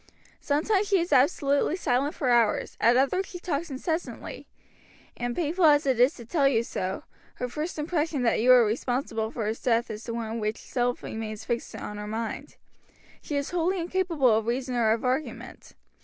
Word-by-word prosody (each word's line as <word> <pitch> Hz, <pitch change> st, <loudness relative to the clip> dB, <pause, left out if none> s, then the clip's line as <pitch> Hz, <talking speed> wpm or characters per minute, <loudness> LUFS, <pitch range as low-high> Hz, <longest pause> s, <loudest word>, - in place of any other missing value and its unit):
"Sometimes 380 Hz, +8 st, +1 dB
she 395 Hz, -2 st, +3 dB
is 345 Hz, +1 st, -1 dB
absolutely 280 Hz, +2 st, +3 dB
silent 280 Hz, -4 st, 0 dB
for 260 Hz, -, -1 dB
hours, 235 Hz, -3 st, +2 dB
at 235 Hz, +2 st, +5 dB
others 275 Hz, +9 st, +1 dB
she 365 Hz, -, -8 dB
talks 335 Hz, -2 st, -3 dB
incessantly; 320 Hz, +5 st, -4 dB, 0.7 s
and 240 Hz, 0 st, -3 dB
painful 340 Hz, +2 st, +1 dB
as 295 Hz, -1 st, +5 dB
it 260 Hz, -3 st, +1 dB
is 250 Hz, +3 st, +5 dB
to 235 Hz, -, -11 dB
tell 280 Hz, +3 st, +2 dB
you 235 Hz, -4 st, +2 dB
so, 190 Hz, -4 st, -4 dB, 0.3 s
her 250 Hz, -, -3 dB
first 305 Hz, +8 st, -4 dB
impression 305 Hz, -3 st, -1 dB
that 230 Hz, -, +2 dB
you 240 Hz, +3 st, +2 dB
were 250 Hz, -2 st, +8 dB
responsible 225 Hz, 0 st, -1 dB
for 225 Hz, -1 st, -4 dB
his 220 Hz, +2 st, -3 dB
death 235 Hz, -1 st, +1 dB
is 215 Hz, +1 st, -7 dB
the 230 Hz, -, -4 dB
one 230 Hz, 0 st, -3 dB
which 215 Hz, +1 st, -2 dB
still 245 Hz, -1 st, -1 dB
remains 220 Hz, -1 st, -6 dB
fixed 235 Hz, 0 st, -3 dB
on 210 Hz, -, -6 dB
her 210 Hz, -, -6 dB
mind. 225 Hz, +1 st, -5 dB, 0.7 s
She 295 Hz, -, -5 dB
is 280 Hz, 0 st, -2 dB
wholly 355 Hz, +2 st, 0 dB
incapable 335 Hz, -8 st, +2 dB
of 220 Hz, 0 st, -1 dB
reason 250 Hz, +2 st, -1 dB
or 230 Hz, -3 st, +2 dB
of 225 Hz, +3 st, 0 dB
argument. 260 Hz, +5 st, -3 dB
255 Hz, 185 wpm, -27 LUFS, 230-310 Hz, 0.7 s, were